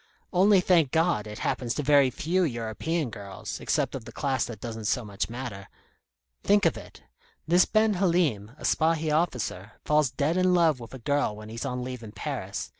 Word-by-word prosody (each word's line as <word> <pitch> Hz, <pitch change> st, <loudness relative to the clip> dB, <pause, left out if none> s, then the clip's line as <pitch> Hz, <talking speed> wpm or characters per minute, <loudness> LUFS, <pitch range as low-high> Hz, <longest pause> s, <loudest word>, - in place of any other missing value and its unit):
Only, 190 Hz, +1 st, +5 dB
thank 170 Hz, -6 st, +3 dB
God, 160 Hz, -8 st, +1 dB
it 105 Hz, 0 st, -7 dB
happens 120 Hz, -2 st, -1 dB
to 150 Hz, -, -2 dB
very 140 Hz, -2 st, +5 dB
few 175 Hz, +8 st, 0 dB
European 125 Hz, +3 st, -2 dB
girls, 100 Hz, -2 st, -7 dB
except -, -, 0 dB
of 135 Hz, -, -5 dB
the -, -, -9 dB
class 135 Hz, -4 st, -1 dB
that 115 Hz, -4 st, -8 dB
doesn't 110 Hz, -1 st, -6 dB
so 120 Hz, +2 st, 0 dB
much 100 Hz, 0 st, -3 dB
matter. 115 Hz, -5 st, -7 dB, 0.7 s
Think 205 Hz, +1 st, +4 dB
of -, -, +3 dB
it. -, -, -12 dB, 0.4 s
This 175 Hz, +2 st, +5 dB
Ben 215 Hz, 0 st, +2 dB
Halim, 170 Hz, -, +1 dB
a -, -, -13 dB
Spahi 160 Hz, -1 st, +1 dB
officer, 120 Hz, -, -2 dB
falls 150 Hz, -2 st, +3 dB
dead 145 Hz, +7 st, 0 dB
in 185 Hz, 0 st, +3 dB
love 160 Hz, -6 st, +3 dB
with 120 Hz, +2 st, -9 dB
a -, -, -6 dB
girl 140 Hz, -2 st, 0 dB
when 110 Hz, 0 st, -10 dB
he's 115 Hz, +4 st, -5 dB
on 125 Hz, -2 st, -3 dB
leave 125 Hz, -1 st, -6 dB
in 110 Hz, -2 st, -10 dB
Paris. -, -, -4 dB
135 Hz, 190 wpm, -27 LUFS, 115-165 Hz, 0.7 s, Only